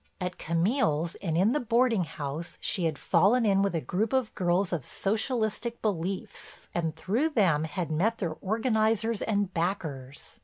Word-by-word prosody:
At 180 Hz, -1 st, -4 dB
Camille's 165 Hz, -, +1 dB
and 165 Hz, -4 st, -1 dB
in 195 Hz, +6 st, +4 dB
the 295 Hz, -, +1 dB
boarding 235 Hz, -5 st, +2 dB
house 155 Hz, +3 st, -5 dB
she 180 Hz, -, -1 dB
had 155 Hz, -2 st, 0 dB
fallen 230 Hz, +5 st, +3 dB
in 195 Hz, -2 st, +4 dB
with 200 Hz, -3 st, +1 dB
a 165 Hz, -, 0 dB
group 200 Hz, -, -1 dB
of 260 Hz, -4 st, +1 dB
girls 180 Hz, 0 st, +1 dB
of 160 Hz, -6 st, -1 dB
Socialistic 220 Hz, -, -1 dB
beliefs 190 Hz, -2 st, -4 dB
and, 165 Hz, -2 st, -1 dB
through 245 Hz, +12 st, 0 dB
them, 180 Hz, -, +2 dB
had 165 Hz, 0 st, -3 dB
met 210 Hz, +9 st, +1 dB
their 170 Hz, -5 st, -2 dB
organizers 220 Hz, +1 st, +1 dB
and 205 Hz, -3 st, 0 dB
backers. 155 Hz, -7 st, -4 dB
195 Hz, 160 wpm, -28 LUFS, 165-220 Hz, -, in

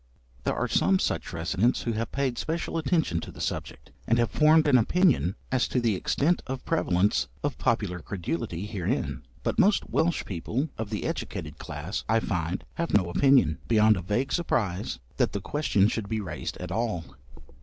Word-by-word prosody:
There -, -, +1 dB
are -, -, 0 dB
some 95 Hz, +2 st, +3 dB
such -, -, -2 dB
residents 95 Hz, +8 st, +1 dB
who 120 Hz, -, -1 dB
have 115 Hz, 0 st, -3 dB
paid 135 Hz, -3 st, -1 dB
special 165 Hz, +1 st, -2 dB
attention 160 Hz, -, +1 dB
to -, -, -7 dB
the -, -, -13 dB
subject, -, -, -4 dB, 0.2 s
and 115 Hz, -, +3 dB
have 120 Hz, -1 st, +1 dB
formed 155 Hz, 0 st, +5 dB
an 130 Hz, -3 st, +6 dB
opinion 140 Hz, -, +3 dB, 0.2 s
as 130 Hz, -1 st, +2 dB
to 125 Hz, -, 0 dB
the 115 Hz, -3 st, +2 dB
extent 145 Hz, -, +1 dB
of 130 Hz, 0 st, -5 dB
prevalence 100 Hz, -, +2 dB, 0.2 s
of 145 Hz, -1 st, -2 dB
popular 105 Hz, -7 st, 0 dB
credulity 85 Hz, 0 st, -4 dB
herein; 105 Hz, -5 st, -2 dB, 0.2 s
but -, -, -1 dB
most 205 Hz, +1 st, +4 dB
Welsh 170 Hz, +1 st, +1 dB
people 110 Hz, -, -2 dB
of 110 Hz, -2 st, -4 dB
the 105 Hz, -2 st, -3 dB
educated -, -, -4 dB
class, 75 Hz, +7 st, -5 dB
I 115 Hz, 0 st, +4 dB
find, 90 Hz, -5 st, -2 dB
have 170 Hz, -7 st, 0 dB
no 90 Hz, -4 st, +3 dB
opinion, 130 Hz, -, +4 dB
beyond 110 Hz, -1 st, +5 dB
a 95 Hz, -, -3 dB
vague 105 Hz, +9 st, -1 dB
surprise 105 Hz, -, -1 dB, 0.2 s
that -, -, +1 dB
the 100 Hz, -, -1 dB
question 105 Hz, -3 st, +2 dB
should 110 Hz, -2 st, -3 dB
be 110 Hz, -, -1 dB
raised 100 Hz, -, -5 dB
at 90 Hz, 0 st, -6 dB
all. 110 Hz, -5 st, -1 dB
110 Hz, 180 wpm, -27 LUFS, 95-135 Hz, 0.2 s, an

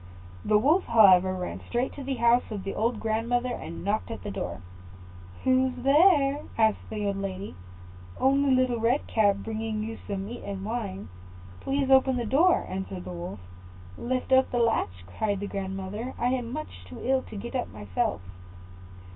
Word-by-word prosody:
The 210 Hz, -, +4 dB
Wolf, 300 Hz, -, +3 dB
however, 190 Hz, -5 st, +6 dB
ran 180 Hz, -1 st, -4 dB
straight 245 Hz, +2 st, -1 dB
to 280 Hz, -, -8 dB
the 270 Hz, 0 st, -2 dB
house 235 Hz, +1 st, +3 dB
of 205 Hz, -4 st, -5 dB
the 195 Hz, -, -4 dB
old 230 Hz, 0 st, 0 dB
grandmother, 235 Hz, +3 st, 0 dB
and 165 Hz, -, -7 dB
knocked 210 Hz, +4 st, -1 dB
at 225 Hz, -, -6 dB
the 205 Hz, -, -4 dB
door. 100 Hz, -, -5 dB, 0.8 s
"Who's 260 Hz, 0 st, +2 dB
there?" 285 Hz, +1 st, +4 dB, 0.2 s
asked 220 Hz, -2 st, +2 dB
the 210 Hz, -1 st, -3 dB
old 200 Hz, -1 st, -1 dB
lady. 195 Hz, 0 st, -5 dB, 0.7 s
"Only 275 Hz, +1 st, +3 dB
Little 255 Hz, -2 st, +1 dB
Red 240 Hz, +5 st, +1 dB
Cap, 205 Hz, -3 st, +3 dB
bringing 220 Hz, -1 st, -3 dB
you 225 Hz, +1 st, -6 dB
some 195 Hz, -1 st, -3 dB
meat 240 Hz, +4 st, -7 dB
and 195 Hz, -1 st, -5 dB
wine; 105 Hz, -, -4 dB, 0.5 s
please 270 Hz, 0 st, -1 dB
open 265 Hz, -1 st, +5 dB
the 240 Hz, -, -2 dB
door," 310 Hz, +11 st, +3 dB
answered 185 Hz, -, -5 dB
the 90 Hz, -, -6 dB
Wolf. 90 Hz, +3 st, -7 dB, 0.5 s
"Lift 255 Hz, -, -3 dB
up 260 Hz, 0 st, +5 dB
the 245 Hz, -, -2 dB
latch," 155 Hz, -, 0 dB
cried 200 Hz, -, -2 dB
the 205 Hz, -, -3 dB
grandmother; 195 Hz, +5 st, -5 dB
"I 245 Hz, -, +1 dB
am 250 Hz, -2 st, -2 dB
much 280 Hz, -, -7 dB
too 85 Hz, -, -10 dB
ill 265 Hz, +1 st, +2 dB
to -, -, -9 dB
get 235 Hz, +5 st, -6 dB
up 250 Hz, -2 st, -2 dB
myself." 100 Hz, -4 st, -2 dB
225 Hz, 175 wpm, -27 LUFS, 195-255 Hz, 0.8 s, however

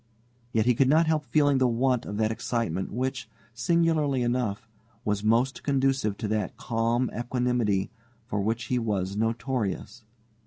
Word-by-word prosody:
Yet 110 Hz, -2 st, +2 dB
he 125 Hz, -, +4 dB
could 130 Hz, +2 st, +3 dB
not 160 Hz, +3 st, +5 dB
help 155 Hz, -2 st, 0 dB
feeling 145 Hz, +1 st, +3 dB
the 130 Hz, -, +4 dB
want 125 Hz, +1 st, +1 dB
of 105 Hz, -, -4 dB
that 110 Hz, 0 st, +1 dB
excitement 110 Hz, -6 st, -2 dB
which, 130 Hz, +3 st, -3 dB, 0.2 s
singularly 150 Hz, 0 st, +1 dB
enough, 120 Hz, -3 st, -1 dB, 0.4 s
was 105 Hz, -1 st, 0 dB
most 120 Hz, +5 st, +2 dB
conducive 135 Hz, -7 st, +1 dB
to 110 Hz, -, -3 dB
that 105 Hz, -3 st, -2 dB
calm 115 Hz, +2 st, 0 dB
equanimity 120 Hz, -4 st, 0 dB, 0.3 s
for 105 Hz, -4 st, -2 dB
which 115 Hz, +4 st, -1 dB
he 125 Hz, +2 st, 0 dB
was 100 Hz, -4 st, -1 dB
notorious. 115 Hz, +1 st, -2 dB
120 Hz, 150 wpm, -27 LUFS, 110-130 Hz, 0.4 s, not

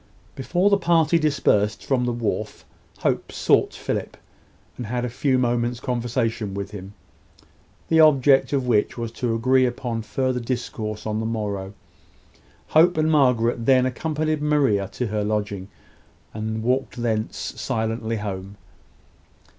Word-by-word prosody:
Before 175 Hz, +9 st, +1 dB
the 200 Hz, -, +4 dB
party 170 Hz, -2 st, +3 dB
dispersed 130 Hz, -9 st, +1 dB
from 125 Hz, -3 st, +1 dB
the 120 Hz, -, 0 dB
wharf 115 Hz, -3 st, -3 dB, 0.4 s
Hope -, -, 0 dB
sought -, -, +2 dB
Philip, -, -, -4 dB, 0.6 s
and 120 Hz, -, -6 dB
had 125 Hz, +2 st, -2 dB
a -, -, -3 dB
few 130 Hz, +2 st, +1 dB
moments' 120 Hz, -1 st, 0 dB
conversation 115 Hz, -4 st, -2 dB
with 100 Hz, 0 st, -5 dB
him, 100 Hz, -1 st, -9 dB, 0.9 s
the 160 Hz, -, +3 dB
object 140 Hz, -3 st, +5 dB
of 135 Hz, -3 st, 0 dB
which 115 Hz, -2 st, +1 dB
was 115 Hz, -1 st, -4 dB
to 115 Hz, -1 st, -2 dB
agree 130 Hz, +3 st, +3 dB
upon 120 Hz, -2 st, -3 dB
further 125 Hz, +4 st, -1 dB
discourse 115 Hz, -3 st, -4 dB
on 110 Hz, 0 st, -1 dB
the 110 Hz, -, -2 dB
morrow. 100 Hz, -3 st, -3 dB, 0.9 s
Hope 170 Hz, +3 st, +5 dB
and 155 Hz, 0 st, +2 dB
Margaret 120 Hz, -5 st, +2 dB
then 130 Hz, -1 st, +5 dB
accompanied 155 Hz, +3 st, -1 dB
Maria 135 Hz, -10 st, +2 dB
to 125 Hz, -, -2 dB
her 105 Hz, -1 st, -2 dB
lodging, 105 Hz, -2 st, -2 dB, 0.7 s
and 110 Hz, +1 st, -3 dB
walked 130 Hz, +1 st, -1 dB
thence 110 Hz, -2 st, -1 dB
silently 110 Hz, 0 st, -3 dB
home. 100 Hz, -1 st, -6 dB
120 Hz, 140 wpm, -23 LUFS, 110-135 Hz, 0.9 s, object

